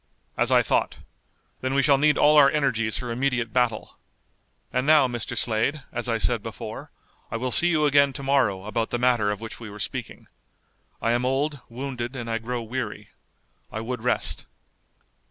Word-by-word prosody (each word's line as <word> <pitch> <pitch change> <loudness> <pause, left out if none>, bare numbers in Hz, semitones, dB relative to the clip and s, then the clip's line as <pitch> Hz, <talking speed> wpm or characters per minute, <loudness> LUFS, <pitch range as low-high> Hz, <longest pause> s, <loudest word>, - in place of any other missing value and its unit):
"As - - +1
I - - +5
thought. - - 0 0.6
Then 130 +1 -2
we 140 - +3
shall 140 0 +4
need 150 0 +4
all 150 +1 +5
our 145 -2 +8
energies 115 -8 0
for 125 -2 -4
immediate 120 -2 -1
battle. 120 -4 -1 0.7
And 125 +2 0
now, 150 -4 +6
Mr. 120 -2 -4
Slade, 125 +6 +1
as 120 0 -3
I 115 - +1
said - - 0
before, - - -7 0.4
I - - -3
will 125 +2 -2
see 175 - +4
you 155 -3 +2
again 140 -1 +4
to 140 - -6
morrow 120 -9 +1
about 115 +1 -2
the 120 - -1
matter 120 -4 +2
of 105 +1 -3
which 115 - -7
we 115 -2 -8
were 105 - -10
speaking. 105 - -5 0.8
I 115 - +2
am 120 +1 +1
old, 140 +3 0
wounded, 125 0 -5
and 120 -3 -5
I 115 - 0
grow 120 +1 -4
weary. 110 -3 -5 0.6
I 110 - -4
would 125 +1 -4
rest." 125 +1 -1
125 Hz, 185 wpm, -25 LUFS, 115-140 Hz, 0.8 s, our